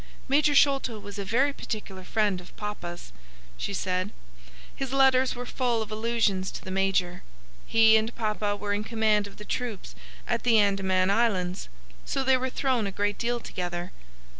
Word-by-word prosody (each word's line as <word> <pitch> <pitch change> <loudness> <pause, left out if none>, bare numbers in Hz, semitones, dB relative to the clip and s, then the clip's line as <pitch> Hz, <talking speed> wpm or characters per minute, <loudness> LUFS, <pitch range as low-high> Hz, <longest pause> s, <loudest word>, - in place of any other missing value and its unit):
"Major 290 +2 +3
Sholto 275 -5 +3
was 205 -1 -8
a - - -2
very 260 +8 +2
particular 200 -7 -6
friend 205 -2 0
of 180 - -16
papa's," 175 - -6 0.4
she - - -4
said. 185 +1 -1 0.7
"His 270 -2 -4
letters 265 -1 +4
were 245 +1 -5
full 240 -3 0
of 215 - -12
allusions 215 -4 0
to - - -7
the 185 - -5
major. 185 -2 0 0.5
He 225 -1 +6
and 220 +2 -2
papa 210 -2 -1
were 205 0 -2
in 205 +1 -1
command 215 -2 +1
of 200 - -14
the 210 - -10
troops 235 -6 -4 0.3
at 235 -1 0
the 235 -2 +4
Andaman 195 -2 +2
Islands, 190 - 0 0.3
so 270 - -1
they 265 0 +4
were 260 0 -1
thrown 255 -5 0
a - - -3
great 205 +1 -1
deal 240 +1 0
together. 175 -4 -5
215 Hz, 170 wpm, -27 LUFS, 195-240 Hz, 0.7 s, He